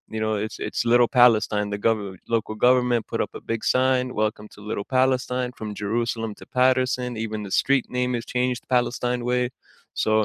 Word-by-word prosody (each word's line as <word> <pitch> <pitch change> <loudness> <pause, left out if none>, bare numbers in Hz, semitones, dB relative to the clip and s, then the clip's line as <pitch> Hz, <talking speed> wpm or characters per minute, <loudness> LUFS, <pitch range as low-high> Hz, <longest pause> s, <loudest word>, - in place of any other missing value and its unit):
you - - -2
know 110 0 0
it's - - -8
it's - - -2
Little 120 -1 +6
Palestine 105 -3 +4
The 100 - -3
gover 100 -4 0 0.2
local 110 -1 -2
government 125 -2 +3
put - - 0
up - - -25
a - - -7
big 115 - -1
sign, 130 0 +2 0.2
Welcome 105 0 -3
to - - -14
Little 100 - -2 0.2
Palestine, 125 -1 +1
From 110 - -5
Jerusalem 115 +1 -1
to - - -12
Paterson, 130 -1 +2
even 110 -1 -4
the 100 - -8
street 135 -2 +2
name 125 0 +1
is 115 - -9
changed 125 0 0
Palestine 125 0 0
Way. 125 0 +2 0.6
So 110 - +1
120 Hz, 185 wpm, -24 LUFS, 110-125 Hz, 0.6 s, Little